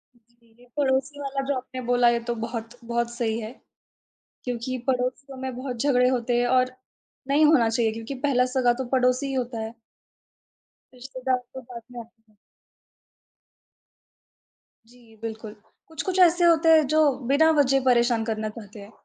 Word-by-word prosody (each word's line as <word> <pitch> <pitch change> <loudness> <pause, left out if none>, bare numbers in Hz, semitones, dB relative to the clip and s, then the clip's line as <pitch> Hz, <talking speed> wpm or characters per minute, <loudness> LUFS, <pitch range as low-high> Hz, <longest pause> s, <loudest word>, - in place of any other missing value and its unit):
जी, 235 0 -31
जी, 240 +2 -21
पड़ोसी 270 +1 0
वाला 275 -1 -3
जो 280 - 0
आपने 255 0 -7
बोला 245 0 +3
ये 235 0 +1
तो 240 0 -3
बहुत, 230 0 -6
बहुत 235 0 -2
सही 230 -2 -2
है। 220 0 -6 0.9
क्योंकि 250 +1 -3
पड़ोसियों 260 +1 -2
में 260 -1 -4
बहुत 255 -1 -5
झगड़े 250 -3 +3
होते 245 -1 0
हैं 245 - +1
और 255 0 +2 0.5
नहीं 290 +3 +4
होना 280 -7 +4
चाहिए 225 0 +1
क्योंकि 225 +4 -6
पहला 250 -3 +3
सगा 245 -2 +3
तो - - -3
पड़ोसी 255 +1 +2
ही 270 - -4
होता 245 -3 -3
हैं। 220 +1 -5 1.2
रिश्तेदार 255 0 -3 0.2
तो 260 - -7
बाद 240 -1 -10
में 245 - -8
आ - - -9 2.9
जी, 245 0 -20 0.2
बिल्कुल, 220 -1 -7 0.3
कुछ-कुछ 365 +4 -3
ऐसे 350 -1 +5
होते 330 -1 +4
हैं 310 -1 +4
जो 310 - +5 0.2
बिना 295 +4 +4
वजह 270 -1 +2
परेशान 240 -2 +3
करना 215 0 -3
चाहते 210 -1 -11
हैं। 200 +2 -13
250 Hz, 160 wpm, -25 LUFS, 235-270 Hz, 2.9 s, ऐसे